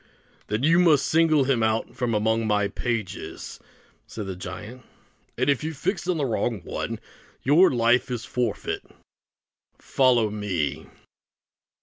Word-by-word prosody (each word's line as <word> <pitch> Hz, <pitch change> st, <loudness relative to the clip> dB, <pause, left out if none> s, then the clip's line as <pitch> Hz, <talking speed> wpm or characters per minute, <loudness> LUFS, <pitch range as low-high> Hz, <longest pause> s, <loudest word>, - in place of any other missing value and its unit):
"Then 105 Hz, +4 st, -2 dB
you 165 Hz, +4 st, +5 dB
must 160 Hz, -6 st, +4 dB
single 155 Hz, -3 st, +4 dB
him 130 Hz, -3 st, +1 dB
out 110 Hz, 0 st, 0 dB
from 120 Hz, -3 st, -1 dB
among 110 Hz, +1 st, +1 dB
my 105 Hz, -1 st, +2 dB
pages," 110 Hz, -1 st, -4 dB, 0.5 s
said 105 Hz, -, -6 dB
the 95 Hz, -1 st, -5 dB
giant; 105 Hz, +7 st, -8 dB, 0.6 s
"and 130 Hz, +2 st, +1 dB
if 140 Hz, 0 st, +2 dB
you 160 Hz, 0 st, -3 dB
fix 175 Hz, +5 st, -2 dB
on 180 Hz, -2 st, +1 dB
the 145 Hz, -, 0 dB
wrong 115 Hz, -3 st, -1 dB
one, -, -, -4 dB, 0.4 s
your 160 Hz, +8 st, +6 dB
life 120 Hz, +1 st, +2 dB
is 120 Hz, -2 st, -3 dB
the -, -, -11 dB
forfeit. 120 Hz, -4 st, -2 dB, 1.0 s
Follow 120 Hz, -5 st, +2 dB
me." 85 Hz, -8 st, -2 dB
120 Hz, 140 wpm, -25 LUFS, 105-140 Hz, 1.0 s, your